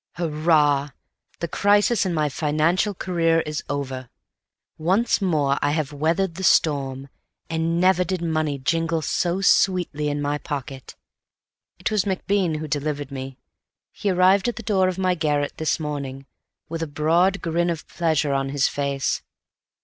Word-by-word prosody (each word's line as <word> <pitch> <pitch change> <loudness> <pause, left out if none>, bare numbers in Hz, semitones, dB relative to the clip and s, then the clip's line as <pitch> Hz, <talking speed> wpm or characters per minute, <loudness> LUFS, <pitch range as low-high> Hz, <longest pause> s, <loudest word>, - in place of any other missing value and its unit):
Hurrah! 150 -3 +2 0.5
The 170 - -1
crisis 205 +4 +2
in 180 - -1
my 155 -1 +1
financial 155 +7 +1
career 165 -3 +1
is 150 0 -4
over. 130 -3 -4 0.7
Once 190 +9 +2
more 150 -7 +1
I 145 0 +1
have 150 -2 -2
weathered 165 +5 0
the 190 +3 -7
storm, 140 -5 +2 0.4
and 165 +1 0
never 185 0 +4
did 185 +1 -2
money 155 -3 -1
jingle 165 +3 0
so 175 +4 0
sweetly 180 -6 +2
in 145 0 -2
my 145 0 -1
pocket. 135 -3 -6 0.8
It - - -2
was 210 -4 +1
MacBean 190 -3 0
who 155 0 -5
delivered 145 -1 -3
me. 135 -1 -6 0.5
He 205 - -2
arrived 185 +3 +4
at 240 - -1
the 225 - -8
door 190 -3 +2
of 185 -1 -2
my 185 -1 +2
garret 150 -4 -1
this 160 +1 0
morning, 140 -3 -5 0.4
with 165 0 -5
a 165 - -2
broad 165 +6 +2
grin 170 +1 0
of 165 -2 -4
pleasure 155 -4 0
on 135 0 -1
his 140 -1 +2
face. 140 -1 -1
160 Hz, 155 wpm, -23 LUFS, 145-180 Hz, 0.8 s, never